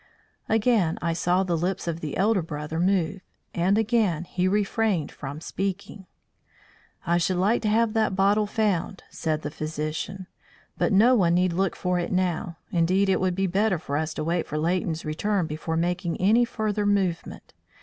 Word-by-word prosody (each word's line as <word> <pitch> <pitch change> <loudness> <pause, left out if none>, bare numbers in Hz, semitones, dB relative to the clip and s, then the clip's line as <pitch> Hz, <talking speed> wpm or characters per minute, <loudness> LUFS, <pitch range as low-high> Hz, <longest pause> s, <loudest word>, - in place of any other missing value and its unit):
Again 220 -6 +2
I 170 0 -1
saw 180 +2 +1
the 175 -3 0
lips 180 +2 -2
of 165 -1 -2
the 155 -3 -5
elder 205 0 +2
brother 155 0 -5
move, 190 +1 +1 0.3
and 185 +4 +2
again 215 -7 +1
he 180 +1 -1
refrained 205 -4 0
from 140 +2 -7
speaking. 195 +2 -5 1.0
"I 170 0 +2
should 180 +1 0
like 205 +6 +2
to 220 - -1
have 225 0 +2
that 220 -4 +1
bottle 205 +2 +3
found," 205 -3 -1
said 155 -1 -2
the - - -4
physician; 155 +5 -4 0.5
"but - - 0
no 220 +6 +5
one 175 -8 +3
need 180 -1 +2
look 190 +1 0
for 180 -1 -1
it 175 - -3
now. 180 -2 -1
Indeed, 185 +3 +2
it 190 - +2
would 185 -1 +1
be 195 +1 0
better 190 +1 +1
for 145 -3 -5
us 155 +1 -2
to 155 - -3
wait 170 +2 -1
for 150 - -4
Leighton's 165 0 -1
return 185 +5 0
before 160 +1 -3
making 175 +1 -1
any 220 +6 +4
further 215 -3 -2
movement. 190 -4 -1
185 Hz, 175 wpm, -25 LUFS, 165-200 Hz, 1.0 s, no